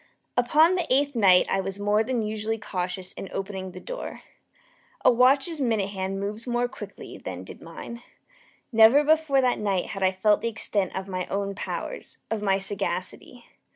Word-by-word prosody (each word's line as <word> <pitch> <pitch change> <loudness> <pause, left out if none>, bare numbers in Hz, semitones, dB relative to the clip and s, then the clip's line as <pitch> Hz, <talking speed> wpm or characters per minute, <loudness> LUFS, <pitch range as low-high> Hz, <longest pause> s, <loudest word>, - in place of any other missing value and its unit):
Upon 300 +8 +4
the 355 -6 -2
eighth 280 +1 +2
night 190 -5 +5
I 195 - +1
was 195 0 -5
more 205 +1 +2
than 235 0 -1
usually 215 +1 -2
cautious 185 -2 -4
in 195 - -7
opening 190 -1 -4
the 185 0 -9
door. - - -7 0.8
A - - +8
watch's 270 +6 +3
minute 220 -6 +1
hand 195 0 -3
moves 210 +4 -5
more 240 0 +1
quickly 210 -6 -10
than 90 -1 -6
did - - -11
mine. 235 +8 -9 0.7
Never 225 +5 +7
before 305 -3 +3
that 250 -1 +1
night 195 -3 0
had 195 - -5
I 190 0 +4
felt 205 +3 +2
the 230 - 0
extent 210 -3 -2
of 190 0 -4
my 185 -2 -3
own 200 0 -2
powers - - -6
of 220 -2 -1
my 195 -2 +2
sagacity. 195 +4 -3
210 Hz, 175 wpm, -26 LUFS, 190-245 Hz, 0.8 s, A